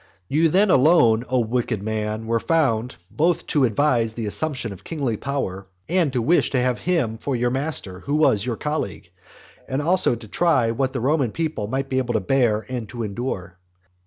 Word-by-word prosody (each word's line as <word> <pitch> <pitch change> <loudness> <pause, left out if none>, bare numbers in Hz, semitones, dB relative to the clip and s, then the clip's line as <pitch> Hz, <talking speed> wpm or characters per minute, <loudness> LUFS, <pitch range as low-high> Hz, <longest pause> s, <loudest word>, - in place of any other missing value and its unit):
You 160 +3 +3
then 195 +4 +3
alone, 125 -6 +5
O 130 - +1
wicked 115 -2 -1
man, 110 0 -3
were 115 +1 +1
found, 125 - +1 0.2
both 170 +3 +1
to 145 -4 +4
advise 115 -2 +1
the 115 - -3
assumption 125 0 -2
of 95 - -14
kingly 140 -8 -2
power, 100 -7 -4 0.2
and 170 -4 +1
to 125 -3 0
wish 170 +8 +3
to 130 - 0
have 125 -3 0
him 145 -12 0
for 135 +1 -2
your 120 0 0
master 130 -9 -3
who 140 +9 -2
was 130 -10 +3
your 120 -1 -2
colleague; 110 - -4 0.6
and 130 - -1
also 170 -3 +2
to 115 -1 -11
try 130 -4 +2
what 130 +2 -1
the 130 - -2
Roman 135 -1 +1
people 155 -10 -3
might 135 +4 -2
be 130 -1 0
able 120 -2 -2
to - - +3
bear 110 0 +1
and 120 -5 -5
to 115 +2 -5
endure. 100 -4 -5
125 Hz, 190 wpm, -22 LUFS, 110-145 Hz, 0.6 s, alone